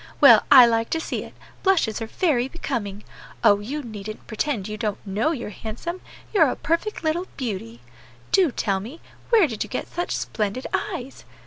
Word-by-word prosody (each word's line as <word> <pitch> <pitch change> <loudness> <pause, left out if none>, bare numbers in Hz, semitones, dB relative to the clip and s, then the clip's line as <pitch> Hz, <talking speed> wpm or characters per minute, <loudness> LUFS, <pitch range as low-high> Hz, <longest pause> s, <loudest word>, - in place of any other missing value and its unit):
Well, - - +9
I 255 -3 +10
like 230 -1 +1
to - - -2
see - - -3
it; - - -13 0.3
blushes 325 - +2
are 225 - -3
very 255 -3 +1
becoming. 220 -10 -4 0.4
Oh! 205 -3 +6
you 280 +8 -5
needn't 215 -2 -8
pretend 220 -2 -2
you 215 - -4
don't 210 -1 -2
know 205 +9 0
you're 240 -9 -4
handsome; 240 - -6 0.3
you're 325 -9 +5
a - - -2
perfect 335 +5 -2
little 330 +4 0
beauty. 185 - -5 0.5
Do 360 -7 +4
tell 195 -4 0
me, 245 - -9 0.3
where 450 -6 +6
did 225 -8 -3
you - - -11
get 255 - -3
such 350 0 -2
splendid 215 +4 -3
eyes! 260 +2 -4
240 Hz, 180 wpm, -24 LUFS, 210-315 Hz, 0.5 s, I